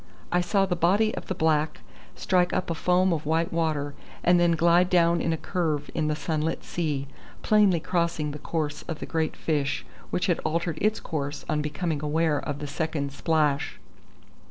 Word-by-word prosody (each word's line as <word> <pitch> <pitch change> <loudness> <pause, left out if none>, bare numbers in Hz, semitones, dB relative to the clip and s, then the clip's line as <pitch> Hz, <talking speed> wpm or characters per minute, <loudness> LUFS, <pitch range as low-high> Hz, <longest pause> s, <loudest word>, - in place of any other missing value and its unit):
I 175 - +3
saw 195 +2 +2
the 180 -2 -1
body 200 +6 +3
of - - -6
the 190 - -2
black 155 -2 +1 0.3
strike 180 -1 +1
up 180 - -1
a - - +1
foam 180 +2 +2
of 155 -2 -3
white 165 +2 +1
water, 155 -4 0 0.3
and 175 0 +5
then 175 -1 +4
glide 170 +2 +4
down 170 -2 +3
in 165 - 0
a 160 - 0
curve 155 -5 -2
in 155 -2 0
the 150 - 0
sunlit 155 0 -2
sea, 150 -5 -2 0.4
plainly 205 -5 +4
crossing 170 -3 -1
the 150 - -7
course 150 -1 -3
of 160 - -3
the - - -6
great 160 -2 -1
fish, 140 -3 -1 0.2
which 180 - 0
had 175 - +1
altered 165 0 -1
its 215 +1 +2
course 145 -2 -4
on 150 - 0
becoming 150 0 -2
aware 150 0 +1
of 145 -2 -4
the 145 - -5
second 145 -1 -2
splash. 150 -1 0
160 Hz, 185 wpm, -26 LUFS, 150-175 Hz, 0.4 s, and